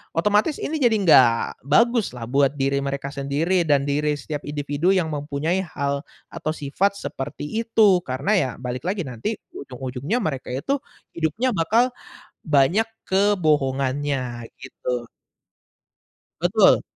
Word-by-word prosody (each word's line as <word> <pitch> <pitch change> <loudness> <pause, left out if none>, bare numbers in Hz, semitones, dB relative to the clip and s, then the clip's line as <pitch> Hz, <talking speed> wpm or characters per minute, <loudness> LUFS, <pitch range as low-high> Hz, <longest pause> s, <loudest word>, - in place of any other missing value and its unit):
otomatis 210 - +2
ini 315 - -2
jadi 235 -3 +4
nggak 120 -7 +4
baguslah 200 - +2
buat 140 0 +3
diri 140 0 0
mereka 140 0 -3
sendiri 155 +6 +1
dan 140 -2 +3
diri 150 +1 +1
setiap 150 +1 -5
individu 145 +4 0
yang 185 -4 +2
mempunyai 150 +5 -1
hal 140 -4 -2 0.3
atau 155 - -3
sifat 195 +8 0
seperti 135 +2 -5 0.2
itu. 210 -5 +4
Karena 130 +10 -2
ya 135 -7 +1
balik 125 +2 -4
lagi 190 -2 -1
nanti 125 - -3 0.2
ujung-ujungnya 130 - -4
mereka 135 -5 -3
itu 140 - -1 0.4
hidupnya 170 - 0
bakal 230 +10 +2 0.5
banyak 160 +9 +3 0.2
kebohongannya, 140 - 0
gitu. 125 -2 -4 1.3
Betul. - - +5
145 Hz, 120 wpm, -23 LUFS, 135-190 Hz, 1.3 s, Betul